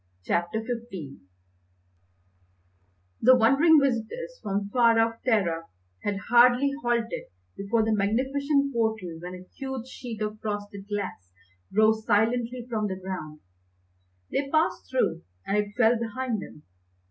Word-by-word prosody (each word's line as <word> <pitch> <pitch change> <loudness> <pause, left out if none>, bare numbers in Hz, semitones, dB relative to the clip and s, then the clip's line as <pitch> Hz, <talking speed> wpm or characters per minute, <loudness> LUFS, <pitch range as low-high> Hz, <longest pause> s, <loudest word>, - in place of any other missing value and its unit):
CHAPTER 170 - 0
XV 225 - -6 2.0
The 255 +3 +7
wondering 275 +7 +5
visitors 280 - -2
from 200 0 -2
far 230 0 +4
off 225 0 +1
Terra 180 -9 +1 0.4
had 205 -1 -1
hardly 245 +3 +6
halted 235 -1 -1 0.3
before 220 +3 0
the 220 - +1
magnificent 275 +7 +1
portal 220 -8 -1
when 180 +2 -7
a 180 0 -11
huge 265 -3 -4
sheet 235 -4 -6
of 215 0 -4
frosted 205 -2 -5
glass 195 - -5 0.4
rose 220 +2 +3
silently 235 +3 +1
from 220 -3 -1
the 190 - -3
ground. 170 -5 -6 0.9
They 275 0 -1
passed 315 +2 +1
through 170 -10 0 0.2
and 200 - 0
it 205 0 -1
fell 230 -1 +4
behind 235 -1 -2
them. 150 - -11
225 Hz, 125 wpm, -27 LUFS, 200-250 Hz, 2.0 s, The